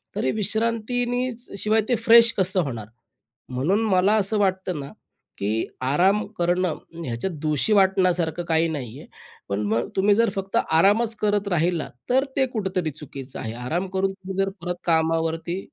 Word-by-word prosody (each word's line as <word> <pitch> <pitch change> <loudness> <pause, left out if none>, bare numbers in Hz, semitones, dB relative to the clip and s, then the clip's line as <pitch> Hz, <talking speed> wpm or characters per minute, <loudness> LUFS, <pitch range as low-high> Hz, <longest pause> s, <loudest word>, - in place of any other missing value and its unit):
तरी 130 - 0
विश्रांतीनीचं 230 +3 -1
शिवाय 215 +1 +2
ते 245 - +3
फ्रेश 230 +1 +6
कसं 185 0 +4
होणार 115 -7 -5 0.6
म्हणून 165 - 0
मला 190 +2 +3
असं 210 +1 +1
वाटतं 190 -4 0
ना 140 - -7 0.5
की 105 +3 -1 0.2
आराम 190 +8 +3
करणं 175 -1 +1 0.3
ह्याच्यात 120 +10 -3
दोषी 155 +7 +1
वाटण्यासारखं 185 -4 +2
काही 165 0 +2
नाहीये. 130 -8 -6 0.4
पण 100 +1 -1
मग 115 +2 0
तुम्ही 200 +1 +4
जर 230 -1 +3
फक्त 195 0 -2
आरामच 205 +8 +3
करत 205 -1 +1
राहिलात 170 -2 0 0.2
तर 260 +2 +3
ते 265 - +4
कुठेतरी 185 -7 -2
चुकीचं 140 -2 -9
आहे. 110 0 -5
आराम 160 +11 -3
करून 190 0 +1
तुम्ही 190 0 -8
जर 195 - -1
परत 180 0 -3
कामावरती 165 +1 0
185 Hz, 150 wpm, -23 LUFS, 160-210 Hz, 0.6 s, फ्रेश